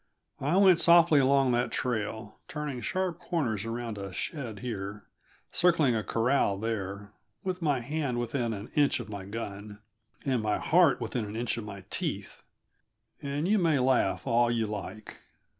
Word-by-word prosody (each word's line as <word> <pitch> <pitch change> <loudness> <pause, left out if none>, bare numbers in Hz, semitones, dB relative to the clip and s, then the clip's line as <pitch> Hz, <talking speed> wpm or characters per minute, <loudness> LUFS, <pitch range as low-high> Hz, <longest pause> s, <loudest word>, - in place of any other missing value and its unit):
I 150 +7 +1
went 190 -4 +6
softly 170 -2 +6
along 135 -1 +4
that 120 0 +1
trail, 110 -3 -3
turning 150 -5 -4
sharp 185 +1 -2
corners 145 - -2
around 115 -2 -4
a 100 -1 -6
shed 120 - -5
here, 100 -3 -5 0.5
circling 160 -8 +3
a 110 - -1
corral 115 -3 +1
there, 100 -2 -4 0.3
with 185 -1 -3
my 145 -6 +1
hand 140 -2 -2
within 120 0 -1
an 105 0 -6
inch 145 -3 +3
of 115 -3 -7
my 100 -2 -6
gun, 105 -1 -6 0.5
and 130 -4 +1
my 105 -1 0
heart - - +4
within 120 -3 -2
an 105 +1 -7
inch 120 +1 -1
of 115 -2 -6
my 100 -2 -8
teeth, - - -3 0.8
and 145 +4 -2
you 210 +1 +3
may 165 -5 +3
laugh 130 0 +2
all 120 -1 +3
you 115 -1 +1
like. 105 0 -7
120 Hz, 160 wpm, -29 LUFS, 105-145 Hz, 0.8 s, went